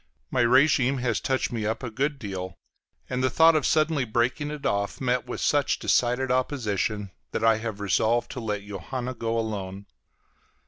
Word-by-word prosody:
My - - +2
régime 130 +1 +4
has 120 -3 0
touched 130 -1 -1
me 115 -2 -3
up 110 +4 -2
a 120 - -4
good 140 +5 -1
deal, 95 -6 -6 0.5
and 130 0 -2
the 130 - +3
thought 160 +5 +5
of 155 - +2
suddenly 155 -2 +2
breaking 125 +6 0
it 150 -1 -7
off 100 -6 -1
met 125 -1 0
with 125 - -5
such 145 -1 +2
decided 125 +1 +1
opposition 110 -6 -1 0.2
that - - -2
I 115 -1 +5
have 110 -2 -5
resolved 110 +4 +1
to - - -5
let 105 -3 -3
Johanna 120 +6 -5
go 115 -1 -2
alone. 100 -3 -4
120 Hz, 175 wpm, -26 LUFS, 105-130 Hz, 0.5 s, thought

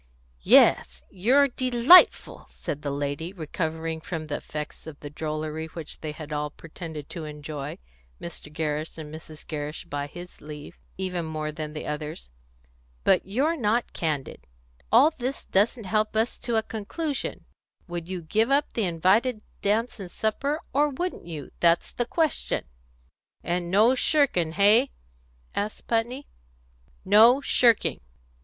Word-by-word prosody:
"Yes, - - +5
you're 255 +10 +4
delightful," 255 +6 +5
said 150 - -5
the 145 - -3
lady, 145 +5 -3
recovering 160 -1 -3
from 160 -1 -5
the 150 -1 -3
effects 150 +1 -7
of 150 -2 -9
the 145 - -8
drollery 155 +1 -4
which 160 -1 -8
they 155 - -4
had 150 0 -8
all 150 0 -1
pretended 160 -1 -9
to 165 -3 -6
enjoy, 150 -1 -6 0.4
Mr. 165 -3 -8
Gerrish, 155 0 -3
and 155 -1 -8
Mrs. 155 -1 -10
Gerrish 150 +1 -5
by 145 -3 -4
his 175 +4 -11
leave, 150 0 -10 0.2
even 185 -2 -2
more 155 -1 -3
than 150 0 -6
the 155 - -6
others. 150 - -5 0.7
"But - - +3
you're 275 +11 +1
not 235 -3 0
candid. 150 -5 -3 0.4
All 310 - +7
this 260 -2 -4
doesn't 215 +4 +1
help 215 +2 0
us 225 +2 0
to 240 -2 -2
a 220 - +2
conclusion. 270 +8 -4 0.4
Would 175 -1 -5
you 185 -2 -4
give 220 +9 +1
up 280 +1 +2
the 225 - 0
invited 200 +8 +2 0.2
dance 225 +3 0
and 190 -3 -7
supper, 275 - -1
or 295 +2 +3
wouldn't 320 - -4
you? 155 -5 -7
That's 170 0 +3
the 240 - -2
question." 320 +4 0 0.8
"And 175 0 -1
no 215 +7 +5
shirking, 255 - +2
hey?" 215 +8 +5 0.6
asked 210 +1 -3
Putney. 240 +5 -1 0.8
"No 220 +7 +7
shirking." 240 -5 +3
175 Hz, 145 wpm, -26 LUFS, 155-230 Hz, 0.8 s, All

